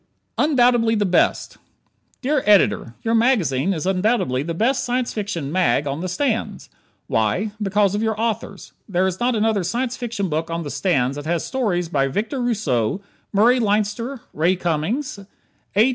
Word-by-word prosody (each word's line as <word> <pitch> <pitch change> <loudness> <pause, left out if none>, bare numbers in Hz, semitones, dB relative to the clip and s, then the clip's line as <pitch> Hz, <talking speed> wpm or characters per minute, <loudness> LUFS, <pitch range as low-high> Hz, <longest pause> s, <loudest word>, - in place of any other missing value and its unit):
"Undoubtedly 245 -6 +3
the 205 -1 +1
Best" 180 -2 +1 0.6
Dear 285 +1 +1
Editor: 195 - +3
Your 225 - 0
magazine 195 - +2
is 170 -3 -3
undoubtedly 185 - +1
the 165 +3 -4
best 245 +9 +1
Science 245 0 -1
Fiction 195 -9 -3
"mag" 180 -4 +2
on 140 +1 -3
the 185 - -3
stands. 230 +6 -2 0.3
Why? 115 - 0
Because 200 -1 +2
of 205 - -1
your 220 -1 -1
authors. 225 -1 -3 0.2
There 185 -1 +1
is 190 -1 -2
not 245 0 +1
another 215 -2 +1
Science 240 +8 -2
Fiction 230 -5 -3
book 160 0 -2
on 165 0 -3
the 145 - -6
stands 140 -7 0
that 145 +1 -6
has 170 0 -1
stories 200 -10 -1
by 140 -4 +1
Victor 225 - -2
Rousseau, 185 - 0 0.3
Murray 235 +5 +4
Leinster 215 +4 -1
Ray 170 +5 +2
Cummings, 180 - -2 0.6
A. 220 +6 +5
205 Hz, 160 wpm, -21 LUFS, 170-235 Hz, 0.6 s, A